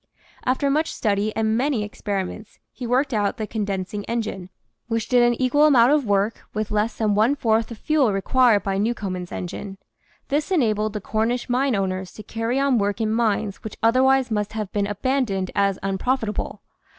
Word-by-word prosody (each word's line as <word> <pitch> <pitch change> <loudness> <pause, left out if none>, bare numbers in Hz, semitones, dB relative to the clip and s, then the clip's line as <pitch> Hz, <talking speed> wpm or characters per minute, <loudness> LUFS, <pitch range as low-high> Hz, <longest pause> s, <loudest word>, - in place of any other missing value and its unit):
After 265 +2 +1
much 310 +3 +1
study 205 0 0
and 220 0 +1
many 255 -2 +1
experiments 205 0 -5
he 245 - -6
worked 260 +3 +1
out 205 +2 0
the 220 - -2
condensing 205 -2 -3
engine, 215 -6 -3 0.4
which 230 -2 -1
did 250 -1 +4
an 240 -1 +3
equal 290 +4 +4
amount 250 -3 +5
of 295 -5 +2
work 205 +2 0
with 215 0 -2
less 215 +2 0
than 215 -2 +1
one 220 +7 +3
fourth 225 -4 +1
the 230 - -8
fuel 275 0 +2
required 215 +2 +3
by 195 0 -1
New 230 +4 +1
comen's 185 -4 -5
engine. 195 +2 -6 0.5
This 295 +3 0
enabled 215 - +1
the 210 - -4
Cornish 230 +5 -1
mine 255 0 +2
owners 190 -1 -2
to 215 - -10
carry 230 +4 -2
on 275 -4 +2
work 205 +1 -1
in 220 -1 0
mines 215 -3 0
which 220 - -7
otherwise 260 +2 +4
must 210 0 -1
have 215 -3 -4
been 205 -1 0
abandoned 205 -3 -1
as 195 -1 +1
unprofitable. 215 +3 -2
220 Hz, 180 wpm, -23 LUFS, 205-250 Hz, 0.5 s, amount